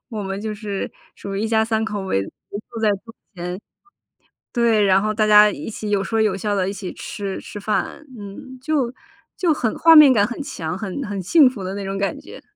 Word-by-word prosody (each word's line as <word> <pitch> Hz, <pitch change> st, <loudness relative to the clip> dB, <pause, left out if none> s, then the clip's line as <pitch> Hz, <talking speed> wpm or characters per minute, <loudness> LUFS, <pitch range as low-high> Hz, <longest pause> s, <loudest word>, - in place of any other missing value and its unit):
我 220 Hz, -4 st, -5 dB
们 195 Hz, 0 st, -4 dB
就 215 Hz, 0 st, -3 dB
是 205 Hz, -2 st, -4 dB, 0.2 s
属 195 Hz, 0 st, -6 dB
于 -, -, -1 dB
一 220 Hz, -, 0 dB
家 220 Hz, -1 st, +3 dB
三 220 Hz, 0 st, 0 dB
口 210 Hz, -2 st, -3 dB
围 190 Hz, -, 0 dB
围 200 Hz, -, -9 dB
坐 230 Hz, -2 st, -6 dB
在 215 Hz, -, +4 dB
桌 225 Hz, -1 st, -13 dB, 0.2 s
前， 180 Hz, +1 st, -5 dB, 0.9 s
对， 230 Hz, -4 st, +3 dB
然 195 Hz, 0 st, +4 dB
后 215 Hz, 0 st, 0 dB
大 215 Hz, 0 st, +2 dB
家 210 Hz, 0 st, +7 dB
一 -, -, -7 dB
起 215 Hz, -1 st, -5 dB
有 200 Hz, -1 st, +1 dB
说 225 Hz, +3 st, 0 dB
有 210 Hz, -3 st, +1 dB
笑 205 Hz, +1 st, -1 dB
地 190 Hz, -1 st, 0 dB
一 -, -, -2 dB
起 195 Hz, -2 st, -6 dB
吃 200 Hz, -3 st, -5 dB
吃 -, -, -9 dB
饭， 215 Hz, +8 st, -2 dB
嗯， 205 Hz, +6 st, -10 dB
就 275 Hz, -5 st, 0 dB, 0.4 s
就 350 Hz, -3 st, +2 dB
很 245 Hz, -7 st, -1 dB
画 330 Hz, 0 st, +7 dB
面 295 Hz, -4 st, +9 dB
感 205 Hz, -4 st, +4 dB
很 240 Hz, +5 st, -7 dB
强， 165 Hz, -, -5 dB
很 210 Hz, +6 st, -4 dB
很 205 Hz, -1 st, -4 dB
幸 275 Hz, -, +5 dB
福 210 Hz, -7 st, -7 dB
的 190 Hz, +1 st, -4 dB
那 200 Hz, -, -5 dB
种 195 Hz, 0 st, -3 dB
感 195 Hz, 0 st, -1 dB
觉。 -, -, -12 dB
210 Hz, 245 characters per minute, -21 LUFS, 195-230 Hz, 0.9 s, 面